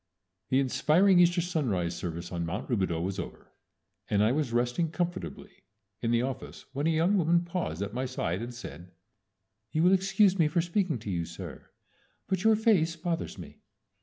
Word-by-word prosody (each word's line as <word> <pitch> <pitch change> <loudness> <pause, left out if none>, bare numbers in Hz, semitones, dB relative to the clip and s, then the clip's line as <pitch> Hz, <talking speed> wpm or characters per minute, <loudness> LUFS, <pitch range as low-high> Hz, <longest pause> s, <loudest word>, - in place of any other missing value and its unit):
The 130 - +3
inspiring 160 +8 +4
Easter 175 0 +4
sunrise 115 - -1
service 85 0 -5
on 85 -1 -2
Mount 85 +5 -4
Rubidaux 95 -8 0
was 95 +1 -3
over, 85 - -8 0.6
and 105 0 +3
I 110 - +4
was 140 -2 0
resting 120 +7 +1
comfortably 185 +4 -4 0.5
in 115 - -1
the 120 +1 +2
office 130 0 -6
when 145 +3 0
a - - +3
young 170 +5 +3
woman 170 +1 +3
paused 170 - -3
at 100 +1 -5
my 130 +2 -2
side, 95 -7 -2
and 120 +1 -5
said, 90 -7 -10 0.8
"You 155 - +1
will 180 +2 +6
excuse 195 0 +3
me 160 - +5
for 170 +3 0
speaking 175 -3 0
to 105 -2 -6
you, 85 -2 -1
sir, 85 0 -9 0.6
but 190 -1 -1
your 220 0 +6
face 195 -7 +3
bothers 165 0 -3
me." - - -11
150 Hz, 180 wpm, -29 LUFS, -, 0.8 s, will